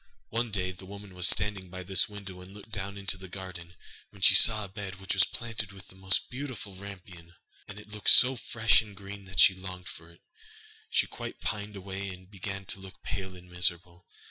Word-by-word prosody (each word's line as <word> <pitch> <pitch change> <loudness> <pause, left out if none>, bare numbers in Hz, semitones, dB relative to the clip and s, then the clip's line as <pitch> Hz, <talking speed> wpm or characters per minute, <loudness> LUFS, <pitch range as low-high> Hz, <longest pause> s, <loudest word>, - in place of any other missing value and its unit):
One 115 +1 0
day 95 -3 -1
the 95 +1 -12
woman 100 -1 -10
was 90 0 +2
standing 95 -3 +1
by 95 +1 -7
this 95 +1 +3
window 95 -3 -8
and 95 +2 -12
looking 105 +2 -13
down 100 -1 -4
into 100 -1 0
the 95 - -9
garden, 90 -2 -8 0.3
when 95 -2 -11
she - - +9
saw 110 +2 +7
a - - -5
bed 95 -1 -6
which 95 0 -2
was 95 +1 +5
planted 115 -4 -4
with 95 -2 -12
the - - -14
most 95 -1 +2
beautiful 125 -7 -5
rampion 95 -2 -9
(rapunzel), 85 0 -17 0.3
and 105 0 -9
it 105 - -13
looked 105 0 0
so 130 +1 +8
fresh 115 -2 +4
and 105 -3 -12
green 100 0 -9
that 95 -4 -4
she 95 - +9
longed 95 -1 -8
for 80 +1 -11
it, 85 - -20 0.7
she - - +3
quite - - -7
pined 105 -1 -3
away, 95 0 -5
and 90 +1 -11
began 95 0 -5
to 100 - -7
look 95 0 -12
pale 95 -1 -4
and 90 0 -14
miserable. 90 -1 -1
95 Hz, 220 wpm, -30 LUFS, 90-105 Hz, 0.7 s, she